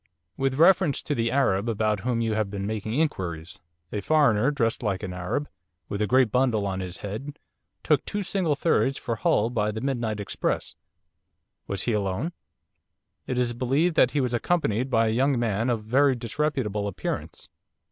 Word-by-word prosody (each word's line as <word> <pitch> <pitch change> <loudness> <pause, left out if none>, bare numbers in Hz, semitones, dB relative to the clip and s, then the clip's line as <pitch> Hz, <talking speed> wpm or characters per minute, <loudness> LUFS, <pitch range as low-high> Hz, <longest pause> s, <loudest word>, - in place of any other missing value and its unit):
'With 135 -1 0
reference 170 -1 +4
to 150 - -1
the 115 -4 0
Arab 115 -5 +1
about 110 -1 0
whom 115 +2 -1
you 115 -1 0
have 110 -2 0
been 100 -1 -4
making 110 +1 -3
inquiries. 90 - -2 0.3
A 105 - -2
foreigner, 135 -3 +3
dressed 115 -6 0
like 105 -5 -2
an 90 - -4
Arab, 90 +11 -2 0.4
with 100 - -3
a 105 - +2
great 130 -2 +4
bundle 120 -5 +2
on 95 -1 -2
his 90 -2 -5
head, 135 +9 -6 0.5
took - - +2
two 205 0 -3
single 180 -5 0
thirds 135 -2 +1
for 115 -1 -3
Hull 110 +2 +2
by 105 -3 0
the 110 - -4
midnight 120 -4 -2
express.' 100 - -2 0.9
'Was 100 -1 -2
he 120 - 0
alone?' 105 - -1 0.9
'It 125 - -2
is 120 -1 +1
believed 135 +8 +1
that 125 - +5
he 145 - 0
was 125 -2 -1
accompanied 125 -3 0
by 115 -3 +3
a 110 - +1
young 130 +3 +2
man 115 0 0
of 115 -3 -1
very 135 +5 +3
disreputable 120 -4 -1
appearance. 100 - -5
115 Hz, 180 wpm, -26 LUFS, 105-135 Hz, 0.9 s, that